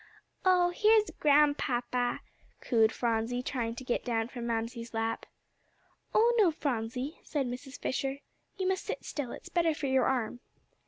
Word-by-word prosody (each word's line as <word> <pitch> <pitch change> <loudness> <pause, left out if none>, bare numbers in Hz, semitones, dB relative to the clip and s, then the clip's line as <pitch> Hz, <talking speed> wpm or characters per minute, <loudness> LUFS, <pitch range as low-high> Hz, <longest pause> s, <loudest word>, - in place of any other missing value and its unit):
"Oh, 360 -1 +4
here's 430 +3 +4
Grandpapa!" 270 -5 +2 0.4
cooed 225 -3 +3
Phronsie, 235 +1 -1
trying 235 -3 -2
to 260 - -7
get 245 - -1
down 230 -2 -1
from 240 -2 -5
Mamsie's 230 0 -3
lap. 225 0 -2 0.8
"Oh, 465 +2 +4
no, 400 -5 +6
Phronsie," 255 -2 -3
said 285 -3 -1
Mrs. 255 +3 -6
Fisher, 270 +1 -2 0.4
"you 375 -1 -1
must 380 0 0
sit - - -5
still; 280 -5 -4
it's - - -9
better 335 -3 +2
for 290 - -4
your 265 -2 +3
arm." 245 -2 0
255 Hz, 150 wpm, -30 LUFS, 235-300 Hz, 0.8 s, no